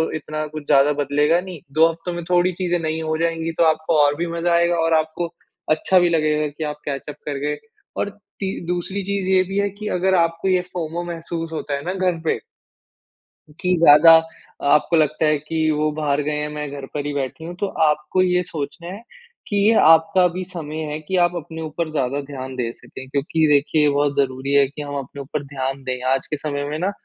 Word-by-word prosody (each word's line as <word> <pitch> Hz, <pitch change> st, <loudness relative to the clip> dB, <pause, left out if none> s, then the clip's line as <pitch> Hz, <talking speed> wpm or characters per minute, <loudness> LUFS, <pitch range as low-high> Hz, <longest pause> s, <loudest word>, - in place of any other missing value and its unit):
इतना 155 Hz, 0 st, -4 dB
कुछ 155 Hz, -1 st, -8 dB
ज़्यादा 140 Hz, +2 st, +5 dB
बदलेगा 145 Hz, +4 st, +2 dB
नहीं, 180 Hz, -3 st, -8 dB
2 160 Hz, +3 st, +5 dB
हफ्तों 165 Hz, +2 st, -6 dB
में 170 Hz, 0 st, -5 dB
थोड़ी 180 Hz, +1 st, +4 dB
चीज़े 175 Hz, -1 st, -1 dB
नई 160 Hz, 0 st, -2 dB
हो 155 Hz, 0 st, -1 dB
जाएँगी, 165 Hz, 0 st, -1 dB
तो 165 Hz, -, +1 dB
आपको 160 Hz, 0 st, +2 dB
और 145 Hz, 0 st, +2 dB
भी 175 Hz, +2 st, -1 dB
मज़ा 170 Hz, +1 st, 0 dB
आएगा 170 Hz, 0 st, +3 dB
और 165 Hz, 0 st, +2 dB
आपको 160 Hz, +2 st, -3 dB, 0.4 s
अच्छा 185 Hz, +4 st, +3 dB
भी 175 Hz, -, +3 dB
लगेगा 155 Hz, -2 st, +1 dB
कि 150 Hz, +2 st, -7 dB
आप 150 Hz, 0 st, -5 dB
कैच-अप 145 Hz, 0 st, -4 dB
करके 145 Hz, 0 st, -2 dB, 0.5 s
और -, -, -1 dB, 0.3 s
ती 195 Hz, -1 st, -2 dB, 0.2 s
दूसरी 180 Hz, +3 st, -2 dB
चीज़ 200 Hz, -1 st, -2 dB
ये 190 Hz, -1 st, +4 dB
भी 195 Hz, +2 st, -3 dB
है 200 Hz, 0 st, +1 dB
कि, 210 Hz, +2 st, -8 dB
अगर 190 Hz, 0 st, +1 dB
आपको 165 Hz, +1 st, +1 dB
ये 180 Hz, -1 st, +3 dB
फोमो 170 Hz, 0 st, -3 dB
महसूस 165 Hz, 0 st, -5 dB
होता 150 Hz, -2 st, -4 dB
है 140 Hz, -, -5 dB
ना 180 Hz, -, -2 dB, 0.2 s
घर 170 Hz, -2 st, -3 dB
पे -, -, +1 dB, 1.2 s
कि 180 Hz, 0 st, +2 dB
ज़्यादा 165 Hz, +1 st, +8 dB, 0.6 s
आपको 150 Hz, +3 st, +3 dB
लगता 155 Hz, 0 st, +2 dB
है 150 Hz, -1 st, +3 dB
कि 155 Hz, +1 st, -1 dB
वो 155 Hz, 0 st, 0 dB
बाहर 145 Hz, -1 st, +1 dB
गए 150 Hz, -, -1 dB
हैं 150 Hz, 0 st, -2 dB
मैं 150 Hz, -1 st, -4 dB
घर 140 Hz, -1 st, -6 dB
पर 145 Hz, -1 st, -3 dB
ही 145 Hz, -, -2 dB
बैठी 140 Hz, +3 st, -4 dB
हूँ, 175 Hz, +1 st, -7 dB
तो 200 Hz, +3 st, -2 dB
आपको 155 Hz, +1 st, +1 dB
ये 180 Hz, -1 st, +2 dB
सोचना 170 Hz, 0 st, -6 dB
है, 195 Hz, +4 st, -7 dB, 0.5 s
कि 205 Hz, -, -3 dB
ये 225 Hz, -, +6 dB
आपका 165 Hz, +3 st, +5 dB
भी 185 Hz, +1 st, -3 dB
समय 160 Hz, -4 st, -6 dB
है 150 Hz, -, -3 dB
कि 170 Hz, +5 st, -4 dB
आप 175 Hz, 0 st, -2 dB
अपने 160 Hz, 0 st, -6 dB
ऊपर 155 Hz, +1 st, -3 dB
ज़्यादा 140 Hz, -1 st, -1 dB
ध्यान 130 Hz, -2 st, -7 dB
दे 120 Hz, -2 st, -2 dB
सकें। 130 Hz, -, -11 dB
क्योंकि 150 Hz, +3 st, +1 dB
देखिये 150 Hz, +1 st, +3 dB
ये 150 Hz, -, +4 dB
बहुत 145 Hz, 0 st, +1 dB
ज़रूरी 135 Hz, 0 st, 0 dB
है 140 Hz, -1 st, +5 dB
कि, 140 Hz, +2 st, -9 dB
हम 145 Hz, -1 st, -5 dB
अपने 140 Hz, +1 st, -7 dB
ऊपर 140 Hz, +1 st, -4 dB
ध्यान 135 Hz, -1 st, -4 dB
दें। 130 Hz, -1 st, -3 dB
आज 135 Hz, -, -2 dB
के 150 Hz, -, -3 dB
समय 145 Hz, -1 st, -3 dB
में 150 Hz, -, -3 dB
ना, 185 Hz, +4 st, 0 dB
155 Hz, 215 wpm, -21 LUFS, 145-175 Hz, 1.2 s, ज़्यादा